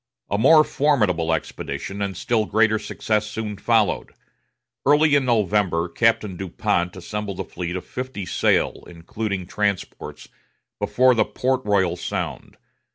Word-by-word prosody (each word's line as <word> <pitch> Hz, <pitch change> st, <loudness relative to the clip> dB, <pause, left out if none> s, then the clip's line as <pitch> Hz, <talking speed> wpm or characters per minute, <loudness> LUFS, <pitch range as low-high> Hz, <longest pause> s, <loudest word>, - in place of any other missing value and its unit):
A 100 Hz, -, +1 dB
more 155 Hz, +6 st, +7 dB
formidable 105 Hz, -, +1 dB
expedition, 95 Hz, +4 st, -4 dB
and 100 Hz, -3 st, -3 dB
still 110 Hz, 0 st, 0 dB
greater 110 Hz, 0 st, +3 dB
success 105 Hz, 0 st, -1 dB
soon 105 Hz, -1 st, -4 dB
followed. 110 Hz, 0 st, +1 dB, 0.7 s
Early 150 Hz, +1 st, +4 dB
in 140 Hz, -2 st, +4 dB
November, 105 Hz, -7 st, +1 dB
Captain 110 Hz, 0 st, +1 dB
Du 95 Hz, 0 st, -5 dB
Pont 85 Hz, +1 st, -1 dB
assembled 100 Hz, +1 st, -5 dB
a -, -, -1 dB
fleet 85 Hz, 0 st, -5 dB
of 90 Hz, -1 st, -5 dB
fifty 130 Hz, -5 st, -5 dB
sail, -, -, +1 dB
including 95 Hz, +3 st, -4 dB
transports, 100 Hz, 0 st, -3 dB, 0.5 s
before 130 Hz, 0 st, +3 dB
Port 130 Hz, +1 st, -1 dB
Royal 95 Hz, -4 st, +2 dB
Sound. 90 Hz, -, -5 dB
105 Hz, 130 wpm, -22 LUFS, 90-115 Hz, 0.7 s, more